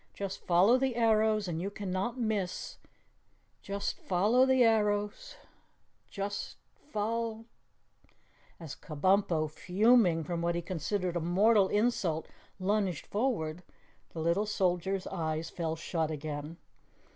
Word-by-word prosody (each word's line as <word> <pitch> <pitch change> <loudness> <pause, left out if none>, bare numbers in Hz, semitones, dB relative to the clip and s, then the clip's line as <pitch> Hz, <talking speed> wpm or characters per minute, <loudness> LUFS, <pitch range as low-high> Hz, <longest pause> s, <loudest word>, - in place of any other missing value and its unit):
"Just 195 -1 -5
follow 190 +8 +5
the 265 -2 0
arrows 220 -3 +2
and 165 -1 -3
you 195 - -2
cannot 200 +4 -3
miss 210 -6 -2 0.8
just 200 0 -4
follow 215 +8 +3
the 260 -1 +4
arrows 210 -2 +1 0.7
just 200 0 -5 0.2
fol 225 -2 -3 0.5
" - - -34
As 160 -5 -7
Kabumpo, 165 0 +1
fuming 185 +1 +3
from 170 +2 -3
what 170 0 0
he 170 - -1
considered 180 +1 -2
a - - +1
mortal 195 +4 +4
insult, 205 -7 0 0.3
lunged 190 -3 0
forward, 200 -8 -1 0.5
the 160 - -6
little 170 +6 +1
soldier's 190 -1 0
eyes 160 -3 -3
fell 165 -2 -2
shut 160 -1 -2
again. 150 +1 -5
195 Hz, 120 wpm, -31 LUFS, 170-215 Hz, 0.8 s, follow